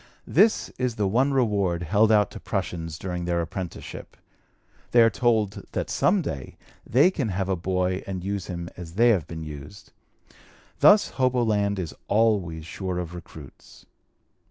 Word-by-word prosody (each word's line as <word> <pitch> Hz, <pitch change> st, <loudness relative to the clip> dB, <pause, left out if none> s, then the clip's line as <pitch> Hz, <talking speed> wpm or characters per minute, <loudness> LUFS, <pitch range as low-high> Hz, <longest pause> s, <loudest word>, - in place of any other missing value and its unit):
This 215 Hz, +6 st, +3 dB
is 125 Hz, -3 st, -1 dB
the 105 Hz, -2 st, 0 dB
one 130 Hz, +8 st, +2 dB
reward 100 Hz, -9 st, +1 dB
held 105 Hz, +6 st, +3 dB
out 105 Hz, -1 st, +4 dB
to -, -, -8 dB
prushuns 85 Hz, -4 st, -4 dB
during 90 Hz, 0 st, -4 dB
their 85 Hz, 0 st, 0 dB
apprenticeship. 85 Hz, +1 st, -6 dB, 0.7 s
They 120 Hz, -1 st, +6 dB
are 115 Hz, -, +4 dB
told 110 Hz, -5 st, 0 dB
that -, -, -2 dB
some 195 Hz, -2 st, +2 dB
day 70 Hz, -, -6 dB, 0.3 s
they 140 Hz, -, +5 dB
can 140 Hz, -, -2 dB
have 95 Hz, 0 st, -2 dB
a 95 Hz, -, +1 dB
boy 90 Hz, +1 st, -1 dB
and 95 Hz, -2 st, -4 dB
use 100 Hz, -1 st, -3 dB
him 85 Hz, -2 st, -5 dB
as 85 Hz, -1 st, -9 dB
they 120 Hz, +3 st, +5 dB
have 95 Hz, -10 st, +2 dB
been 80 Hz, -1 st, -7 dB
used. 75 Hz, +5 st, -10 dB, 0.9 s
Thus 205 Hz, 0 st, +6 dB
hoboland 115 Hz, -6 st, +1 dB
is 85 Hz, -5 st, -4 dB
always 100 Hz, -7 st, +1 dB
sure 95 Hz, +1 st, -4 dB
of 90 Hz, -1 st, -4 dB
recruits. 80 Hz, -6 st, -13 dB
95 Hz, 155 wpm, -25 LUFS, 85-115 Hz, 0.9 s, They